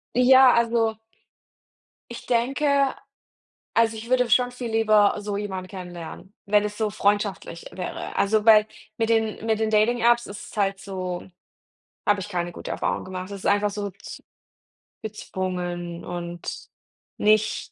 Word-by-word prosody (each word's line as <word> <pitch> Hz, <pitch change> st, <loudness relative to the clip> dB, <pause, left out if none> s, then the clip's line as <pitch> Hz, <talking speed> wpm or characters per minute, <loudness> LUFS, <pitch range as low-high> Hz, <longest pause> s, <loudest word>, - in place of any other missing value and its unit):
Ja, 255 Hz, +1 st, +7 dB
also. 230 Hz, -1 st, +2 dB, 1.2 s
Ich 235 Hz, -, -8 dB
denke 275 Hz, +3 st, +2 dB, 0.8 s
also, 225 Hz, -1 st, +3 dB
ich 225 Hz, +2 st, -8 dB
würde 250 Hz, -1 st, +2 dB
schon 245 Hz, +2 st, +3 dB
viel 245 Hz, -1 st, -6 dB
lieber 215 Hz, -2 st, +4 dB
so 205 Hz, -1 st, -3 dB
jemanden 190 Hz, -3 st, -5 dB
kennenlernen, 180 Hz, +1 st, -9 dB
wenn 205 Hz, +1 st, +3 dB
es 210 Hz, 0 st, -5 dB
so 220 Hz, -1 st, 0 dB
freundschaftlich 205 Hz, -4 st, -1 dB
wäre. 180 Hz, -1 st, -6 dB
Also, 210 Hz, +2 st, +2 dB
weil 215 Hz, -1 st, +7 dB, 0.3 s
mit 225 Hz, -, +1 dB
den 225 Hz, -1 st, 0 dB
mit 220 Hz, -1 st, +1 dB
den 220 Hz, -, +1 dB
Dating 220 Hz, +3 st, +2 dB
Apps 240 Hz, +1 st, +4 dB
ist 200 Hz, -, -9 dB
es -, -, -13 dB
halt 195 Hz, -1 st, +1 dB
so 185 Hz, -3 st, -5 dB, 0.8 s
habe 205 Hz, -1 st, +3 dB
ich 195 Hz, -, -6 dB
keine 175 Hz, -2 st, -2 dB
gute -, -, -8 dB
Erfahrungen -, -, -2 dB
gemacht. 185 Hz, 0 st, -6 dB
Das 200 Hz, -1 st, -7 dB
ist -, -, -7 dB
einfach 205 Hz, +1 st, +3 dB
so 205 Hz, 0 st, -4 dB
z 195 Hz, -, -11 dB, 0.8 s
gezwungen 180 Hz, -4 st, -4 dB
und 175 Hz, -1 st, -6 dB, 0.5 s
nicht 215 Hz, 0 st, +2 dB
210 Hz, 150 wpm, -24 LUFS, 190-230 Hz, 1.2 s, Ja